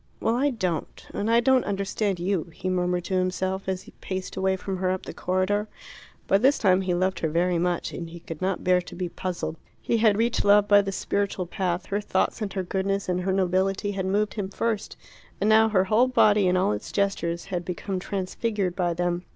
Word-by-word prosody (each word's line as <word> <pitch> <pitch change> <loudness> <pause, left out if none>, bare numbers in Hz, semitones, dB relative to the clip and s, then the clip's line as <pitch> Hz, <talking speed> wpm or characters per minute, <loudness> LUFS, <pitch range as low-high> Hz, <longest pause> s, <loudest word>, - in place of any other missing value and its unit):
"Well, 225 - +1
I 275 +4 +2
don't. 185 - -3
And 210 - -1
I 230 +1 +5
don't 260 0 +4
understand 200 -1 -1
you," 180 -1 0
he 185 - -3
murmured 180 -1 0
to 190 - -5
himself, 190 +1 -2
as 185 -1 -2
he - - -14
paced 185 -1 -5
away 190 0 +1
from 190 0 -4
her 185 0 0
up 185 0 -2
the - - -7
corridor. 190 +3 0 0.6
By 195 - +3
this 270 +6 +4
time 185 -2 +3
he 185 -2 0
loved 185 +2 0
her 160 - 0
very 175 +2 +1
much, 175 0 -1
and 170 -1 -6
he 170 +1 -9
could 165 -1 -8
not 190 0 -1
bear 180 0 +3
to 175 - -11
be 180 -1 -3
puzzled. 175 -2 -4 0.2
He 230 - 0
had 215 -2 +4
reached 230 +1 +1
love 205 0 +5
by 205 0 +7
the 195 -1 -3
spiritual 200 -1 -1
path: 180 0 -2
her 205 +1 -2
thoughts 205 +3 0
and 205 -2 -2
her 190 - -2
goodness 195 +2 -1
and 180 0 0
her 190 +1 0
nobility 190 +2 +1
had 190 -2 -3
moved 205 +2 +1
him 200 -3 -3
first, 220 +1 -2 0.4
and 205 - +1
now 220 +1 +5
her 190 -3 +3
whole 220 +6 +3
body 210 -6 +4
and 180 0 +3
all 185 - +2
its 105 0 -4
gestures 170 -4 -1
had 175 -1 -1
become 185 +2 -4
transfigured 195 0 -2
by 175 -3 0
them. 175 0 -1
190 Hz, 220 wpm, -25 LUFS, 180-205 Hz, 0.6 s, by